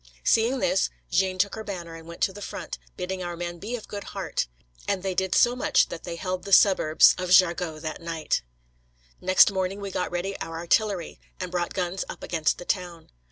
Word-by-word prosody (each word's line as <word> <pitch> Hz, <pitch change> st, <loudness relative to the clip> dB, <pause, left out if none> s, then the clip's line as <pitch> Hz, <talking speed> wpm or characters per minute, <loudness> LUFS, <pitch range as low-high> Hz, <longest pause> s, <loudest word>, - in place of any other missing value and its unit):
Seeing 230 Hz, +4 st, +3 dB
this, 190 Hz, -6 st, +2 dB, 0.2 s
Jeanne 185 Hz, +1 st, +2 dB
took 200 Hz, +2 st, +1 dB
her 220 Hz, -, -5 dB
banner 175 Hz, -5 st, -6 dB
and 165 Hz, 0 st, -11 dB
went 170 Hz, 0 st, -10 dB
to 190 Hz, -, +2 dB
the 205 Hz, -, -10 dB
front, 195 Hz, -, -6 dB, 0.2 s
bidding 185 Hz, +1 st, -3 dB
our 175 Hz, -1 st, -4 dB
men 175 Hz, 0 st, -5 dB
be 225 Hz, +6 st, -4 dB
of 230 Hz, -, -8 dB
good 205 Hz, -1 st, -6 dB
heart. -, -, -2 dB, 0.4 s
And 190 Hz, -2 st, -1 dB
they 190 Hz, -1 st, -1 dB
did 190 Hz, 0 st, 0 dB
so 240 Hz, 0 st, +5 dB
much 290 Hz, +3 st, +3 dB
that 165 Hz, -, -7 dB
they 170 Hz, -1 st, -4 dB
held 185 Hz, +2 st, -3 dB
the 200 Hz, -, -7 dB
suburbs 185 Hz, -6 st, +6 dB
of 180 Hz, 0 st, -3 dB
Jargeau 175 Hz, -3 st, +4 dB
that 155 Hz, +1 st, -5 dB
night. 165 Hz, -2 st, -1 dB, 0.8 s
Next 185 Hz, +2 st, +6 dB
morning 190 Hz, +1 st, -2 dB
we 200 Hz, -1 st, -5 dB
got 180 Hz, -, -2 dB
ready 180 Hz, +3 st, -2 dB
our 165 Hz, 0 st, -5 dB
artillery, 180 Hz, +1 st, 0 dB, 0.2 s
and 185 Hz, -1 st, -4 dB
brought 175 Hz, -1 st, -2 dB
guns 180 Hz, 0 st, -1 dB
up -, -, -8 dB
against 160 Hz, -3 st, 0 dB
the 175 Hz, -, -9 dB
town. 175 Hz, -4 st, -3 dB
185 Hz, 205 wpm, -26 LUFS, 170-195 Hz, 0.8 s, suburbs